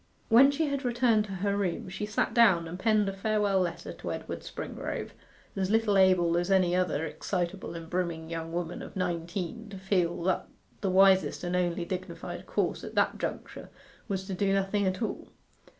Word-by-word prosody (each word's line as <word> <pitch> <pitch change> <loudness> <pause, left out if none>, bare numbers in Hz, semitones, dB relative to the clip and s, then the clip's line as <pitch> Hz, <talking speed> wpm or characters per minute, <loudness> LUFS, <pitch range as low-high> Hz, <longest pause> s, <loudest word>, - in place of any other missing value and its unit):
When 250 +4 +8
she 295 +3 0
had 280 -1 -2
returned 240 -3 +2
to 205 - -9
her 200 0 +1
room 190 -4 -2
she 195 +3 -4
sat 210 +1 0
down 195 -8 +5
and 175 +3 -7
penned 215 0 +3
a 195 - -1
farewell 205 -1 +1
letter 175 -2 -3
to - - -6
Edward - - -5
Springrove, - - -5 0.4
as 190 -1 -1
little 220 -1 +2
able 185 -3 +4
as 175 +2 0
any 185 -2 +3
other 180 -4 0
excitable 175 +2 -3
and 165 -1 -7
brimming 170 -2 -2
young 165 0 -5
woman 175 0 -3
of - - -9
nineteen 180 +4 -3
to 200 - -8
feel 180 -3 0
that 185 +1 0 0.3
the 195 - 0
wisest 190 0 +4
and 175 0 -1
only 175 -1 0
dignified 180 -1 -6
course - - -1
at - - -8
that - - +2
juncture - - -5 0.4
was 190 -3 -2
to 195 - -4
do 195 +1 +1
nothing 195 +1 +1
at 185 +5 -1
all. - - -4
190 Hz, 185 wpm, -29 LUFS, 175-205 Hz, 0.4 s, When